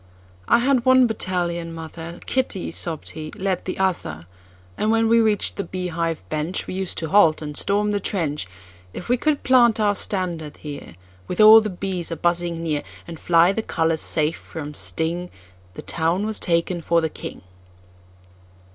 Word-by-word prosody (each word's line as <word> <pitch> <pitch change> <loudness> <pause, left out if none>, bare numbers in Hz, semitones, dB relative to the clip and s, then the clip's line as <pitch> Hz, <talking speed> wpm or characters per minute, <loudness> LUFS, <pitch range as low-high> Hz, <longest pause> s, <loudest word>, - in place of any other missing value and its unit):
"I - - +5
head 250 0 +2
one 260 0 +6
battalion, 175 -6 -2
mother—Kitty," 170 +7 -4
sobbed 165 -1 -3
he, 155 -1 -7
"led 190 -2 -1
the 185 - -4
other! 170 - -1 0.5
And 215 - -1
when 225 0 +3
we 230 +1 +5
reach'd 215 -2 0
the 200 - -1
bee 180 0 -4
hive 165 -1 -2
benchWe 155 +5 -3
used 190 -1 -3
to 160 - -3
halt 165 -4 +5
and 150 -1 -6
storm 205 +4 +1
the 205 - 0
trench:If 95 - -5
we 245 - +4
could 300 +3 0
plant 240 -3 +4
our 205 -1 +3
standard 175 -7 -3
here, 145 - -9 0.3
With 180 - -4
all 215 +1 +10
the 215 - -3
bees 185 -2 -3
a 165 - -3
buzzing 170 0 0
near, 150 -3 -1 0.3
And 170 -1 -8
fly 170 +1 +4
the 225 - -2
colors 160 -5 0
safe 155 0 0
from 150 -2 -8
sting, 170 +4 -2 0.5
The - - -8
town 170 +5 0
was 220 -1 -1
taken 170 +1 0
for 170 +1 +2
the 160 - 0
king!" 150 - -8
175 Hz, 165 wpm, -22 LUFS, 160-205 Hz, 0.5 s, all